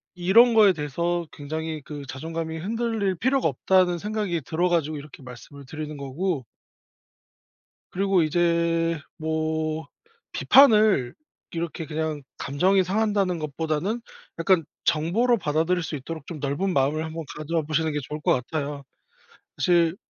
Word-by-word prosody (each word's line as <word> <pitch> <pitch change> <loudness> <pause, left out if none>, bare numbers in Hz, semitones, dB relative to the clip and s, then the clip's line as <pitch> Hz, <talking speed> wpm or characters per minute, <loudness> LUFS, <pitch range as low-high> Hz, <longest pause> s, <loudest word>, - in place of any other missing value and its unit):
이런 210 +7 +5
거에 210 -4 +6
대해서 170 +3 -2
굉장히 155 +1 -5
그 145 0 -8
'자존감이 160 +4 -5
흔들릴 220 +1 -1
필요가 260 +7 +1
없다.'는 180 +5 +2
생각이 205 -4 -2
들어 165 +6 0
가지고 155 -3 0
이렇게 145 -1 -11
말씀을 130 +3 -11
드리는 155 +2 -6
거고 140 +3 -2 1.5
그리고 195 -1 +2
이제 170 0 +1 0.2
뭐 160 -1 -2 0.5
비판을 215 - +5 0.4
이렇게 165 0 -4
그냥 155 -1 -3 0.2
감정이 185 +8 +2
상한다는 200 -2 0
것보다는 160 +8 -2 0.4
약간 165 -1 +3 0.2
정보로 210 +11 +2
받아들일 165 +1 0
수 160 - -4
있도록 150 +2 -7
좀 165 -4 -7
넓은 145 +7 -1
마음을 145 +3 +1
한번 160 +1 -5
가져 160 +2 -1
보시는 155 +1 0
게 150 - -1
좋을 150 - -5
것 - - +3
같아요. 140 +2 -3 0.7
사실 170 -1 +3
165 Hz, 310 characters per minute, -25 LUFS, 150-185 Hz, 1.5 s, 거에